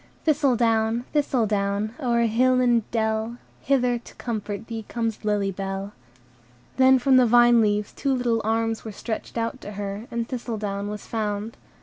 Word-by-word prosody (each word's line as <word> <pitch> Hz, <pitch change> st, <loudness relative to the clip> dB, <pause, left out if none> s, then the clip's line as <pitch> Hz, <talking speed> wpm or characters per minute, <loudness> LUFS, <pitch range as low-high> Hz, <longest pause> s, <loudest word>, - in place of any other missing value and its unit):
"Thistledown! 235 Hz, -6 st, +2 dB
Thistledown! 215 Hz, -7 st, 0 dB
O'er 240 Hz, -4 st, +1 dB
hill 255 Hz, +3 st, +3 dB
and 240 Hz, -3 st, +2 dB
dell 220 Hz, +1 st, -1 dB, 0.2 s
Hither 250 Hz, -3 st, +1 dB
to -, -, -15 dB
comfort 215 Hz, -2 st, -4 dB
thee 225 Hz, -1 st, -6 dB
Comes 230 Hz, -2 st, -3 dB
Lily 205 Hz, -2 st, 0 dB
Bell." 195 Hz, +1 st, -5 dB, 0.8 s
Then 260 Hz, 0 st, +6 dB
from 260 Hz, +1 st, +4 dB
the 250 Hz, -1 st, +5 dB
vine 240 Hz, 0 st, +6 dB
leaves 210 Hz, -1 st, 0 dB
two 275 Hz, -2 st, 0 dB
little 240 Hz, -3 st, 0 dB
arms 225 Hz, +1 st, 0 dB
were 220 Hz, -, -6 dB
stretched 220 Hz, +3 st, -5 dB
out 230 Hz, 0 st, -2 dB
to 205 Hz, -, -8 dB
her, 200 Hz, +2 st, -5 dB
and 235 Hz, -1 st, -3 dB
Thistledown 215 Hz, -5 st, -4 dB
was 210 Hz, -1 st, -6 dB
found. 215 Hz, 0 st, -3 dB
225 Hz, 150 wpm, -24 LUFS, 210-240 Hz, 0.8 s, Then